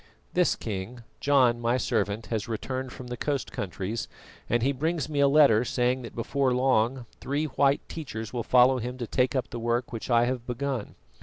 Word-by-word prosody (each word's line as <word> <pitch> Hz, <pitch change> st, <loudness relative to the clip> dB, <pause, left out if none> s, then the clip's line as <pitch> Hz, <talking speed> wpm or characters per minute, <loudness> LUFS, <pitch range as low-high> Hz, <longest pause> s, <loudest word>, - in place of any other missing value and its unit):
"This, -, -, +3 dB
King: 110 Hz, +4 st, -6 dB, 0.2 s
John, 130 Hz, -4 st, +3 dB
my 120 Hz, +2 st, +2 dB
servant, 105 Hz, -2 st, -1 dB
has 110 Hz, +2 st, -2 dB
returned 130 Hz, +3 st, -4 dB
from 130 Hz, -, -9 dB
the 125 Hz, 0 st, -5 dB
coast 140 Hz, +1 st, -2 dB
countries, 100 Hz, +4 st, -4 dB, 0.4 s
and 120 Hz, 0 st, +2 dB
he 135 Hz, -, +3 dB
brings 155 Hz, +1 st, -1 dB
me 150 Hz, -2 st, -2 dB
a 140 Hz, -, +6 dB
letter 140 Hz, -6 st, +5 dB
saying 125 Hz, +1 st, 0 dB
that 120 Hz, -, -9 dB
before 130 Hz, +2 st, 0 dB
long 125 Hz, -1 st, +2 dB
three 145 Hz, +3 st, -1 dB
white 140 Hz, 0 st, +1 dB
teachers 115 Hz, -9 st, -6 dB
will 120 Hz, -, -1 dB
follow 125 Hz, +2 st, +5 dB
him 125 Hz, +2 st, -5 dB
to 120 Hz, -, -3 dB
take 125 Hz, +3 st, +1 dB
up 130 Hz, -, -1 dB
the 120 Hz, -, -4 dB
work 120 Hz, +2 st, -1 dB
which 115 Hz, -, -5 dB
I 120 Hz, -1 st, +4 dB
have 125 Hz, -1 st, -3 dB
begun. 125 Hz, -2 st, -3 dB
125 Hz, 190 wpm, -27 LUFS, 115-135 Hz, 0.4 s, a